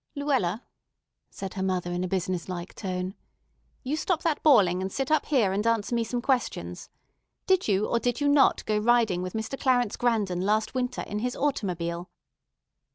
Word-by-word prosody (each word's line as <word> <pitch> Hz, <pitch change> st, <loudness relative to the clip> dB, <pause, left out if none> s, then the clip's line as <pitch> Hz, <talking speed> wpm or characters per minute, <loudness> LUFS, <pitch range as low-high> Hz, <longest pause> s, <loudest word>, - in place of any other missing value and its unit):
"Luella," 255 Hz, -8 st, 0 dB, 0.7 s
said 195 Hz, -1 st, -7 dB
her 190 Hz, -, -4 dB
mother 185 Hz, -2 st, -1 dB
in 175 Hz, +1 st, -2 dB
a -, -, -1 dB
business 185 Hz, -1 st, -2 dB
like 175 Hz, 0 st, -5 dB
tone, 185 Hz, -1 st, -4 dB, 0.7 s
"you 275 Hz, +3 st, -1 dB
stop 335 Hz, +1 st, -1 dB
that 320 Hz, -3 st, 0 dB
bawling, 190 Hz, -, +5 dB
and 190 Hz, 0 st, -3 dB
sit 270 Hz, +5 st, -2 dB
up 310 Hz, -2 st, +2 dB
here 230 Hz, -10 st, +2 dB
and 210 Hz, +3 st, 0 dB
answer 230 Hz, 0 st, +1 dB
me 235 Hz, -1 st, +2 dB
some 240 Hz, +1 st, -3 dB
questions. 260 Hz, -3 st, -2 dB, 0.6 s
Did 375 Hz, -1 st, +2 dB
you 205 Hz, 0 st, +2 dB
or 235 Hz, -, +1 dB
did 245 Hz, +2 st, -1 dB
you 290 Hz, -, +1 dB
not 285 Hz, -1 st, +4 dB
go 215 Hz, -1 st, +1 dB
riding 220 Hz, -5 st, +3 dB
with 185 Hz, 0 st, -5 dB
Mr. 220 Hz, +5 st, -4 dB
Clarence 245 Hz, -4 st, +2 dB
Grandon 210 Hz, -7 st, 0 dB
last 215 Hz, +3 st, +1 dB
winter 250 Hz, -1 st, -2 dB
in 210 Hz, -, -4 dB
his 245 Hz, +2 st, -2 dB
automobile?" 180 Hz, -, -2 dB
220 Hz, 180 wpm, -27 LUFS, 185-255 Hz, 0.7 s, bawling